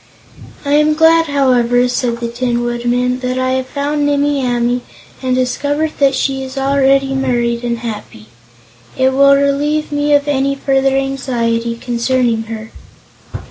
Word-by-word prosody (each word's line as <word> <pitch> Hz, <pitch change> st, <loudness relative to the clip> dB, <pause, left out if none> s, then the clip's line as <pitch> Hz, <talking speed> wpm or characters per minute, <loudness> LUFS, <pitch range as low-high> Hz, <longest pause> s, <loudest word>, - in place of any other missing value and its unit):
"I 285 Hz, -, -1 dB
am 300 Hz, +1 st, +3 dB
glad, 325 Hz, +1 st, +4 dB
however," 250 Hz, -3 st, +2 dB
said 245 Hz, -1 st, -1 dB
the 235 Hz, -, -2 dB
Tin 240 Hz, 0 st, -2 dB
Woodman, 240 Hz, +1 st, -1 dB
"that 255 Hz, 0 st, -3 dB
I 255 Hz, 0 st, 0 dB
have 260 Hz, 0 st, -1 dB
found 290 Hz, +2 st, -2 dB
Nimmie 285 Hz, -1 st, +1 dB
Amee, 245 Hz, 0 st, 0 dB, 0.4 s
and 255 Hz, -1 st, 0 dB
discovered 290 Hz, +4 st, -1 dB
that 275 Hz, -1 st, +3 dB
she 270 Hz, -1 st, -1 dB
is 265 Hz, +1 st, -8 dB
already 270 Hz, 0 st, +2 dB
married 240 Hz, -3 st, -1 dB
and 235 Hz, -1 st, -1 dB
happy. 215 Hz, -, -7 dB, 0.7 s
It 260 Hz, 0 st, +2 dB
will 275 Hz, +1 st, +5 dB
relieve 290 Hz, +2 st, 0 dB
me 290 Hz, 0 st, +2 dB
of 285 Hz, 0 st, +1 dB
any 275 Hz, -1 st, 0 dB
further 270 Hz, -1 st, +1 dB
anxiety 235 Hz, -4 st, -1 dB
concerning 240 Hz, -1 st, 0 dB
her." 220 Hz, 0 st, -7 dB
260 Hz, 145 wpm, -15 LUFS, 240-280 Hz, 0.7 s, will